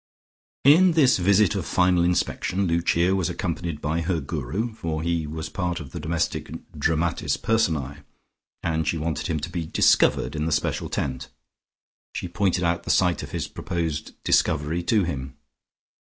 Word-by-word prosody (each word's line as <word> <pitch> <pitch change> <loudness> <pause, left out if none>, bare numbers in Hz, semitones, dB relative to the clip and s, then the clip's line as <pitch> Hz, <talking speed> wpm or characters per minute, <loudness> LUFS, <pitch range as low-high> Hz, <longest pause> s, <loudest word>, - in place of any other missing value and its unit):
In 170 +6 +6
this 140 - +4
visit 100 0 +4
of - - -2
final 90 -1 +2
inspection 90 +2 0
Lucia 85 +2 +2
was 90 -2 0
accompanied 85 -3 -3
by 80 +3 -1
her 85 0 0
Guru, 80 - -3
for 80 -7 -4
he 85 -2 -1
was 80 +1 -5
part 90 -2 -3
of 75 -5 -9
the - - -6
domestic 80 +1 -2 0.2
dramatis 80 +2 0
personae, 80 - 0 0.6
and 80 -2 -1
she 80 - 0
wanted 80 0 -2
him 80 -3 -1
to 85 - -4
be 85 -3 -3
"discovered" - - +3
in 75 0 -1
the 80 - -1
special 75 - -1
tent. 65 -2 -3 0.9
She - - -3
pointed 90 0 0
out 85 0 +1
the - - -9
site - - +2
of - - -7
his - - -3
proposed 80 -4 -4
"discovery" 75 +4 +1
to 105 0 +3
him. 70 -6 -5
85 Hz, 160 wpm, -24 LUFS, 80-90 Hz, 0.9 s, In